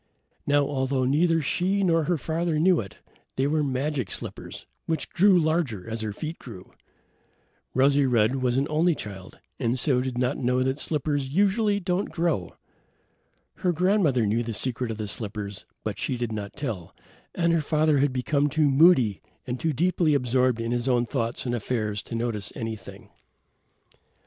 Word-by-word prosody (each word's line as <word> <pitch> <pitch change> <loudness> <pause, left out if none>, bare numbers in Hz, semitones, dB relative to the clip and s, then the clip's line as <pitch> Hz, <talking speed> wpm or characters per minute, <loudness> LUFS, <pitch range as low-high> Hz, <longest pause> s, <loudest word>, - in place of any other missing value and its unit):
Now, 145 0 +3
although 135 -1 -1
neither 165 +4 +2
she 190 +8 0
nor 165 -4 +2
her 175 +1 +1
father 160 +3 -1
knew 175 +2 +4
it, 100 -5 -7 0.4
they 135 - +1
were 150 +2 +1
magic 135 -4 -1
slippers - - -5 0.2
which 160 - -2
grew 190 +1 +5
larger 155 - 0
as 115 0 -3
her 110 -1 -3
feet 155 +10 -6
grew. 105 -8 -11 1.0
Rosy 140 +1 +4
red 120 +1 +2
was 125 -1 0
only 155 +5 +2
a - - -6
child 100 -5 -8 0.2
and 120 0 0
so 125 0 +2
did 130 -1 -4
not 125 +2 0
know 125 0 +1
that 130 +2 -1
slippers 145 -3 -1
don't 140 - -7
usually 205 +1 +2
grow. 175 - -1 1.0
Her 180 - +1
grandmother 175 - +2
knew 110 +3 +1
the 115 -2 -4
secret 125 0 -2
of 110 - -4
the 110 -1 -4
slippers, 100 -2 -5 0.2
but 105 -2 -4
she 130 - -2
did 120 -2 -3
not 105 -2 -5
tell, 110 - -5 0.4
and 170 -1 +2
her 165 - +2
father 155 -1 +2
had 145 0 +2
become 140 +3 0
too 150 -1 +2
moody 135 - +5 0.2
and 125 -1 -4
too 165 - 0
deeply 165 +1 +2
absorbed 125 -2 +1
in 115 0 -2
his 120 +1 -1
own 120 -2 +2
thoughts 115 -1 -3
and 120 - -1
affairs 110 -3 -2
to 115 - -7
notice 115 -4 -2
anything. 110 -4 -7
130 Hz, 170 wpm, -26 LUFS, 115-160 Hz, 1.0 s, grew